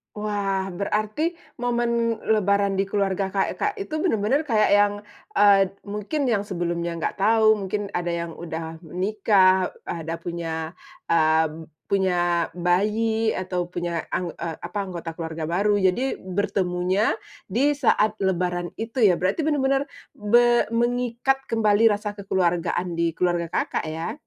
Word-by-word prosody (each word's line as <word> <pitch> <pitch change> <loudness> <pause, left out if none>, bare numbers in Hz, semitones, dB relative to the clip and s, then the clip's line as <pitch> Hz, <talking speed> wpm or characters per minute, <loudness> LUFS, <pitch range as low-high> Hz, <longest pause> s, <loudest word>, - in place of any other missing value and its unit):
Wah, 200 -2 -1
berarti 215 - -1 0.2
momen 235 -1 0
lebaran 200 -2 +2
di 195 - +1
keluarga 195 -1 -1
Kakak 305 - 0
itu 310 -6 -4
benar-benar 280 - +1
kayak 220 -6 +3
yang, 205 0 +4 0.4
eee, 195 -1 +5 0.2
mungkin 230 +7 -2
yang 205 -3 +1
sebelumnya 170 -2 -2
nggak - - -2
tahu, 220 +2 +4
mungkin 200 +1 -3
ada 175 0 -2
yang 170 -1 -4
udah 160 -1 -6
menikah, 190 +1 +2
ada 165 -1 -5
punya, 165 -1 -4 0.3
eee, 160 0 +2 0.2
punya 175 -3 +2
bayi, 215 +6 +1
atau 180 -1 -2
punya 170 -1 -3
ang 180 -1 -1
eee, 165 -1 -4
apa - - -6
anggota 170 -3 -7
keluarga 160 -1 -4
baru. 205 +3 +2
Jadi, 190 +9 +1
bertemunya 185 +1 0 0.3
di 275 +9 +2
saat 220 -6 +2
lebaran 180 -2 0
itu 230 +3 -3
ya? 190 -6 +5
Berarti 185 - 0
benar-benar 280 -2 +1 0.2
be 240 +3 +3
mengikat 245 +3 0
kembali 225 0 +4
rasa 210 0 -2
kekeluargaan 180 -3 -1
di 165 -1 -1
keluarga 175 -2 0
Kakak, - - -1
ya? 160 +1 -4
195 Hz, 130 wpm, -24 LUFS, 175-220 Hz, 0.4 s, eee